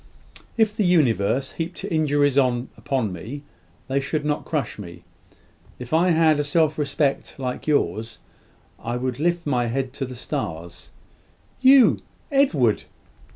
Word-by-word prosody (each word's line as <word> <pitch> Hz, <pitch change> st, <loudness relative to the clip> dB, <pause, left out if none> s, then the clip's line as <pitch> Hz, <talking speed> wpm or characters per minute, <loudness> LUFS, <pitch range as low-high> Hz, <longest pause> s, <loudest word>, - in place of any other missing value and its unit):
"If 215 Hz, -2 st, +2 dB
the 215 Hz, -, +1 dB
universe 135 Hz, -, +2 dB
heaped 170 Hz, +3 st, -5 dB
injuries 145 Hz, -6 st, +1 dB
upon 125 Hz, -3 st, 0 dB
me, 125 Hz, -, -7 dB, 0.4 s
they 135 Hz, +1 st, 0 dB
should 145 Hz, +2 st, -2 dB
not 150 Hz, 0 st, -1 dB
crush 140 Hz, -10 st, -3 dB
me. 85 Hz, -3 st, -10 dB, 0.7 s
If 125 Hz, +3 st, -8 dB
I 170 Hz, +3 st, +4 dB
had 160 Hz, -2 st, +4 dB
a -, -, +1 dB
self 155 Hz, +1 st, +1 dB
respect 140 Hz, -1 st, -1 dB
like 130 Hz, 0 st, -5 dB
yours, 115 Hz, -6 st, 0 dB, 0.6 s
I 120 Hz, +1 st, -3 dB
would 125 Hz, 0 st, -3 dB
lift 170 Hz, +2 st, 0 dB
my 125 Hz, -5 st, +1 dB
head 130 Hz, +2 st, -2 dB
to 135 Hz, -, -3 dB
the 130 Hz, -, -8 dB
stars." 85 Hz, -, -6 dB, 0.7 s
"You, 265 Hz, -1 st, +6 dB, 0.3 s
Edward!" 160 Hz, -, +2 dB
140 Hz, 135 wpm, -23 LUFS, 125-160 Hz, 0.7 s, You